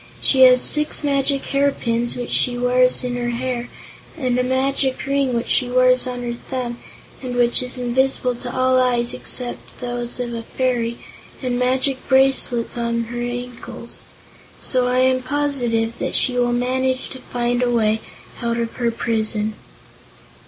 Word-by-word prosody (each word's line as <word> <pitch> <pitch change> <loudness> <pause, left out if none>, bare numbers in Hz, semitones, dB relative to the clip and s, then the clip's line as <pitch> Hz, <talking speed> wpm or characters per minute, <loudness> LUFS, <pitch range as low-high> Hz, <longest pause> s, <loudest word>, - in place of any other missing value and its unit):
"She 265 - +3
has 250 0 +6
six 300 0 +2
magic 275 -1 +1
hairpins, 240 -4 0
which 245 -1 -5
she 245 -1 +2
wears 250 +1 +3
in 250 -1 -2
her 240 0 -2
hair, 245 0 -3 0.5
and 250 -4 0
a - - +2
magic 265 +1 0
ring 275 -2 0
which 235 - -1
she 250 -2 +1
wears 255 0 +3
on 245 -1 -5
her 240 0 -3
thumb 240 0 -5 0.4
and 250 -2 -5
which 240 0 +2
is 250 0 -5
invisible 250 +1 0
to 245 0 -7
all 255 0 +2
eyes 245 -1 +1
except 245 -1 -4
those 245 0 -3
of 240 -1 -3
a 230 - -4
fairy, 235 -1 -2 0.5
and 250 -1 -1
magic 260 +1 0
bracelets 265 -3 +5
on 235 0 -1
both 230 - -10
her 240 0 -4
ankles. 245 0 -5 0.5
So 255 -1 0
I 250 +1 +2
am 260 0 +2
positive 255 -5 -1
that - - -3
she 250 - +2
will 245 -1 +1
manage 255 +1 -1
to 260 - -9
find 245 -1 -2
a 250 - +2
way 220 -2 +1 0.4
out 235 -1 -1
of 230 -1 -3
her 240 -1 +1
prison." 220 -2 -2
250 Hz, 165 wpm, -20 LUFS, 240-260 Hz, 0.5 s, has